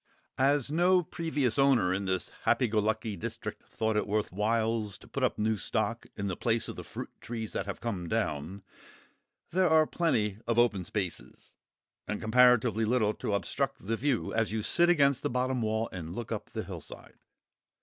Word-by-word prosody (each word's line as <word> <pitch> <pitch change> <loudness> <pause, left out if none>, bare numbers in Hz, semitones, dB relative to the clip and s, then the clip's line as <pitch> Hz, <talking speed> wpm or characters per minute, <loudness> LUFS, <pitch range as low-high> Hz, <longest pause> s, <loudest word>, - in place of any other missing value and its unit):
As 140 0 +2
no 180 +3 +4
previous 150 -7 -1
owner 130 -10 +4
in 100 +1 -2
this 95 -1 -1 0.2
happy 125 - +3
go 110 0 +1
lucky 110 0 -1
district 85 - -6
thought 110 -1 -1
it 105 - 0
worth 105 +1 0
whiles 110 +1 0
to - - -17
put - - -1
new 110 0 +1
stock - - -1
in 100 - -4
the 95 -2 -2
place 115 +3 0
of - - -6
the - - -7
fruit - - -7
trees 115 -2 -5
that - - -2
have 100 - -5
come 95 -8 -3
down, 80 +9 -2 0.9
there 185 0 +3
are 160 0 +5
plenty 110 - 0
of 115 -1 +1
open 115 -6 +3
spaces, 95 -3 -5 0.5
and 105 - -2
comparatively 120 -1 +4
little 110 -2 +2
to 105 - -2
obstruct 135 +4 -2
the 115 +3 0
view 130 0 -1
as 115 -3 +1
you 110 -1 -2
sit 175 +9 +4
against 140 -6 +4
the - - -1
bottom 125 0 0
wall 110 +1 0
and 85 -1 -6
look 120 0 -6
up 110 - -4
the - - -4
hillside. - - -10
110 Hz, 180 wpm, -30 LUFS, 105-130 Hz, 0.9 s, are